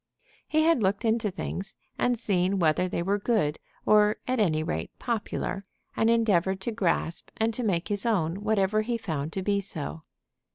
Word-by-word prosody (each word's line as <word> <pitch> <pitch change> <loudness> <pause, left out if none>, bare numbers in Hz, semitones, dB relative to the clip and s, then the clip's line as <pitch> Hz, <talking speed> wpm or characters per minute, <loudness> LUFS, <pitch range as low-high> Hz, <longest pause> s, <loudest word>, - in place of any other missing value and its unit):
He 310 0 +2
had 325 -6 +4
looked 200 +3 +1
into 220 -1 +2
things 195 +1 -5 0.2
and 245 -1 +1
seen 195 -3 +1
whether 175 +1 +2
they 170 - -2
were 200 +3 +1
good, 200 -9 +1 0.3
or 210 0 +5
at 255 -1 0
any 155 -7 +2
rate 80 - -3
popular, 210 -4 -3 0.3
and 225 - +2
endeavored 195 -5 +2
to 235 - -2
grasp 175 -5 -1
and 225 +1 +1
to 250 - -2
make 185 -7 0
his 205 -1 0
own 195 -5 0
whatever 215 0 +2
he 235 +2 -1
found 160 -8 -3
to 190 - -3
be 200 0 +1
so. 160 -4 -6
200 Hz, 175 wpm, -27 LUFS, 180-225 Hz, 0.3 s, or